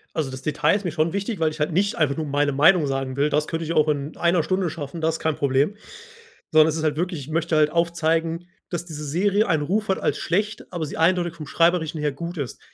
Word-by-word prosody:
Also, 150 -5 -1
das 130 - -7
Detail 150 +6 +1
ist 205 -1 -3
mir 175 - -1
schon 155 +1 0
wichtig, 200 0 -3
weil 160 -1 +2
ich 155 - -10
halt 150 +3 0
nicht 200 +5 +1
einfach 150 -3 +1
nur 160 - -2
meine 145 0 +1
Meinung 150 +3 +4
sagen 135 -1 -2
will. 145 +2 +2
Das 150 +1 0
könnte 165 0 -3
ich 165 - -2
auch 155 -1 +3
in 145 0 -2
1 170 0 +2
Stunde 185 0 0
schaffen. 155 0 -7
Das 160 0 0
kein 160 -1 0
Problem, 140 +7 +1 0.8
sondern 155 -1 +6
es 160 - 0
ist 160 - -3
halt 150 -1 0
wirklich. 175 -2 -2
Ich 135 - -10
möchte 165 0 0
halt 150 0 +4
aufzeigen, 170 0 0 0.2
dass 175 -1 -4
diese 155 -3 -7
Serie 200 +8 +1
einen 155 -3 +1
Ruf 210 +8 -1
hat 190 - +1
als - - 0
schlecht, 210 +4 -2
aber 170 -3 -2
sie 150 - -7
eindeutig 175 0 +2
vom 155 -3 -8
Schreiberischen 165 -1 +1
her 150 -1 0
gut 170 +5 -6
ist. 140 -4 -5
160 Hz, 250 wpm, -23 LUFS, 150-175 Hz, 0.8 s, sondern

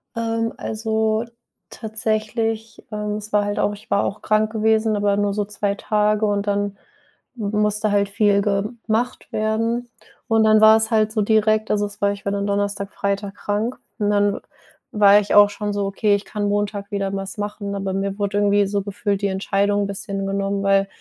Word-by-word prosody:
Ähm, 230 0 -1
also 220 0 -1 0.4
tatsächlich 220 0 -3
ähm, 210 0 -3
es 215 0 -9
war 210 0 +4
halt 205 0 -2
auch 205 - +1
ich 205 +1 -13
war 200 - +3
auch 205 - -3
krank 215 0 +1
gewesen, 220 0 +2
aber 205 -1 +1
nur 205 -1 +1
so 205 0 -1
2 205 -1 -2
Tage, 210 +1 +1
und 205 0 -1
dann 205 -1 -1 0.6
m 205 -2 -3
musste 210 0 +1
halt 200 -1 +2
viel 205 -1 +3
gemacht 220 +4 -2
werden. 225 +3 -1 0.4
Und 225 -1 +3
dann 215 0 +5
war 220 0 +8
es 220 +1 -1
halt 215 -1 +2
so 215 -1 0
direkt 215 0 +2
also, 205 0 +1
es 205 0 -10
war 200 0 +3
ich 200 0 -8
war 200 - 0
dann 200 0 -1
Donnerstag, 200 0 -1
Freitag 200 0 -2
krank, 215 +4 -2 0.2
und 205 0 +1
dann 205 -1 +2
w - - -6 0.5
war 205 -1 +6
ich 210 - -1
auch 205 0 +8
schon 205 0 -4
so: 200 0 -1
„Okay, 205 +1 +2
ich 200 - -3
kann 205 -1 -3
Montag 205 0 -2
wieder 200 -1 -2
was 195 +1 -5
machen“, 205 -1 -4
aber 195 -1 -3
mir 195 0 -2
wurde 205 0 -1
irgendwie 205 0 +3
so 200 0 -1
gefühlt 200 0 -2
die 200 - +1
Entscheidung 200 +1 0
'n 200 - -2
bisschen 195 0 -4
genommen, 195 0 -1
weil 195 0 +3
205 Hz, 195 wpm, -21 LUFS, 200-215 Hz, 0.6 s, war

